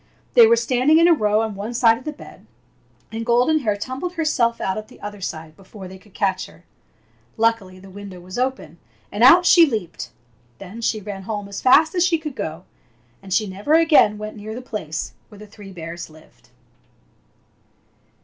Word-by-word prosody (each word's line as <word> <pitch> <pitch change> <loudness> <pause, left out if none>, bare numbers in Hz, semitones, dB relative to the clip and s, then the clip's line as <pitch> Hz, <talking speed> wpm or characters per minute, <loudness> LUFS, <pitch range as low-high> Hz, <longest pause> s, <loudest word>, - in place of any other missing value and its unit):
They 235 -2 +8
were 230 - +5
standing 255 +6 +2
in 335 +1 +5
a 345 - +6
row 215 -6 +1
on 220 -1 -4
one 210 +4 -6
side 230 -1 +4
of - - -17
the 305 - -3
bed, 300 - -15 0.6
and 225 +1 -4
Golden 245 +7 +2
Hair 210 -7 -1
tumbled 260 - -5
herself 260 -9 0
out 190 - -2
at 215 0 -6
the - - -17
other 205 -1 -8
side 160 -3 -6
before 195 +1 -12
they 190 +1 -12
could 205 0 -23
catch 190 -2 -1
her. 175 - -19 0.7
Luckily 225 -5 0
the 190 +1 -14
window 200 -2 -10
was 185 +5 -8
open, 255 -10 -3 0.3
and 205 +3 -1
out 340 +8 +7
she 350 -1 +7
leaped. 210 - -5 0.5
Then 200 +4 -10
she 225 -1 -1
ran 200 -1 -7
home 205 -2 -4
as 200 0 -7
fast 310 +5 +5
as 355 -2 +2
she 355 -2 +2
could 305 -4 -7
go, 165 -5 -5 0.6
and 195 -1 -13
she 215 +3 +2
never 205 +10 0
again 315 -10 +4
went 215 0 -7
near 215 +1 -7
the 250 - -6
place 165 -10 -5 0.2
where 210 - -15
the 210 - -11
three 205 -1 -13
bears 170 -1 -8
lived. 155 0 -20
215 Hz, 195 wpm, -21 LUFS, 195-255 Hz, 0.7 s, They